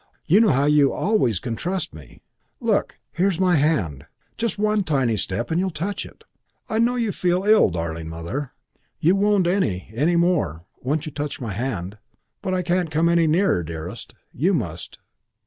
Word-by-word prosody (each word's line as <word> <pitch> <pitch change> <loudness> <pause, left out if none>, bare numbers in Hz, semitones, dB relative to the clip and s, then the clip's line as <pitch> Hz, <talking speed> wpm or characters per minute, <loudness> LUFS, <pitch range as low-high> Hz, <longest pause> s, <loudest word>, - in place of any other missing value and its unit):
You 180 +6 +5
know 225 -2 +5
how 135 +1 +3
you 145 -2 +4
always 130 - +1
can 115 +2 -4
trust 180 - -3
me. 75 -5 -14 0.4
Look, - - 0
here's 185 -1 0
my 180 -3 +3
hand. 105 - 0 0.3
Just 230 -4 -2
one 210 0 +2
tiny 135 -9 +1
step 105 +5 -2
and 165 - +1
you 190 - +1
will - - 0
touch 180 +5 -4
it. - - -18 0.4
I 220 - -1
know 240 +2 +3
you 230 -4 0
feel 180 0 0
ill, 210 - +5
darling 80 -2 -4
Mother. 85 - -5 0.5
You 175 +5 +3
won't 200 -2 +3
any, 170 - 0
any 150 +9 +2
more, 150 - +1 0.2
once 145 +5 -1
you 155 - -5
touch 145 +1 -4
my 115 -5 -4
hand. 105 -4 -4 0.4
But 185 - -1
I 180 - 0
can't 175 -1 0
come 160 +2 +2
any 170 -1 +3
nearer, 165 - +2
dearest. 80 -1 -7 0.2
You - - +2
must. - - -5
155 Hz, 180 wpm, -23 LUFS, -, 0.5 s, You